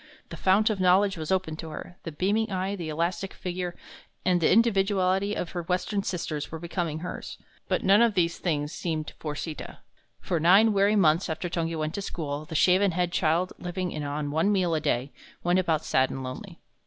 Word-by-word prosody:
The - - -7
fount 205 +4 +3
of 205 - -3
knowledge 190 +2 +4
was 160 -1 -5
opened 180 -4 -1
to 160 - -6
her 165 +3 -8
the 165 - -4
beaming 205 +7 0
eye, 190 +1 -1
the 170 -5 -5
elastic 170 +4 -2
figure, 180 -1 -4 0.5
and 180 -1 +3
the - - +4
individuality 195 -2 +2
of 175 - -3
her 175 - -3
Western 180 +4 -1
sisters 160 -6 -4
were 160 - -4
becoming 165 -1 -3
hers. 180 - -6 0.3
But - - 0
none 200 +3 +5
of 230 -3 +3
these 170 -2 +1
things 150 -4 -1
seemed 160 -3 -3
for 150 -2 -4
Sita. 155 0 -6 0.4
For 170 - -1
nine 195 +7 +6
weary 200 +1 +3
months 170 -2 +3
after 165 +3 -3
Tungi 165 -1 -2
went 155 0 -2
to 200 - -3
school, 150 -5 -4
the 160 - -8
shaven 185 +3 +4
headed 175 0 0
child, 170 +2 +1
living 180 0 -4
on 145 0 -3
one 160 +7 +2
meal 185 -4 +1
a 155 - 0
day, 140 -2 -1 0.3
went 175 +1 +3
about 160 -4 0
sad 130 0 +2
and 135 - -5
lonely. 130 0 -8
175 Hz, 200 wpm, -27 LUFS, 160-190 Hz, 0.5 s, nine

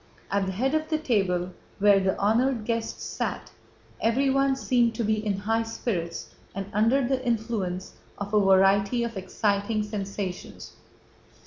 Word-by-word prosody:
At 200 -1 +1
the - - -1
head 260 +8 0
of 310 0 0
the 310 - +1
table, 190 - 0 0.3
where 200 0 +5
the 190 0 0
honored 230 +3 +1
guests 230 -1 -2
sat, - - -4 0.5
everyone 270 +3 +2
seemed 240 -3 +1
to 235 - -1
be 215 0 0
in 205 -3 -1
high 225 +3 0
spirits 190 -7 -4 0.2
and 195 0 -3
under 240 +5 +3
the 260 0 0
influence 220 -6 -2 0.2
of 205 +1 -6
a 210 - +5
variety 200 +4 +4
of 235 -1 -4
exciting 200 +3 0
sensations. 200 -3 -5
215 Hz, 145 wpm, -26 LUFS, 195-235 Hz, 0.5 s, where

